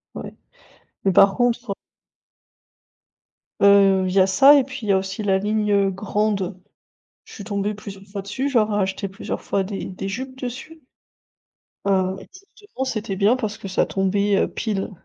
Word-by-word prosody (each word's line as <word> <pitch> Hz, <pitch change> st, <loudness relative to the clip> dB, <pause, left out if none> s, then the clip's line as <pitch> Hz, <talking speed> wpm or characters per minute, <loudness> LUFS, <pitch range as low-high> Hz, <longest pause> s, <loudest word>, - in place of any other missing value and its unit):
Ouais. -, -, -7 dB, 0.7 s
Mais 195 Hz, -, +4 dB
par 195 Hz, +1 st, +5 dB
contre 245 Hz, -3 st, 0 dB, 1.9 s
Heu, 195 Hz, -1 st, +5 dB
il 185 Hz, -, -2 dB
y 195 Hz, -, +4 dB
a 190 Hz, -, +5 dB
ça, 270 Hz, +10 st, +7 dB
et 280 Hz, -, +4 dB
puis 265 Hz, +1 st, -8 dB
il 210 Hz, -, -4 dB
y -, -, +5 dB
a 195 Hz, -, +4 dB
aussi 190 Hz, +2 st, -4 dB
la 195 Hz, -2 st, +2 dB
ligne, 210 Hz, +1 st, 0 dB
heu: 200 Hz, -1 st, +3 dB
«Grande». 200 Hz, -1 st, -2 dB, 0.7 s
Je -, -, -15 dB
suis 205 Hz, -, -8 dB
tombée 205 Hz, 0 st, -2 dB
plusieurs 200 Hz, -1 st, -10 dB
fois 200 Hz, 0 st, -6 dB
dessus, 260 Hz, +8 st, -3 dB
je 270 Hz, -, +1 dB
leur 215 Hz, -1 st, +2 dB
ai 205 Hz, -, +1 dB
acheté 195 Hz, +1 st, -2 dB
plusieurs 195 Hz, -, -6 dB
fois 195 Hz, -, -1 dB
des 195 Hz, +1 st, -5 dB
des 190 Hz, +1 st, -6 dB
jupes 260 Hz, +6 st, -6 dB
dessus. 265 Hz, +6 st, -7 dB, 1.1 s
Heu. 190 Hz, -1 st, +1 dB
Et -, -, -14 dB, 0.3 s
justement, 410 Hz, -11 st, -6 dB
c'était 215 Hz, -6 st, -3 dB
bien 205 Hz, +5 st, +3 dB
parce 215 Hz, -4 st, -4 dB
que 195 Hz, -, -7 dB
ça 190 Hz, -, +1 dB
tombait, 200 Hz, +1 st, +1 dB
heu, -, -, +2 dB
pile. 210 Hz, -4 st, -3 dB
200 Hz, 185 wpm, -22 LUFS, 195-220 Hz, 1.9 s, ça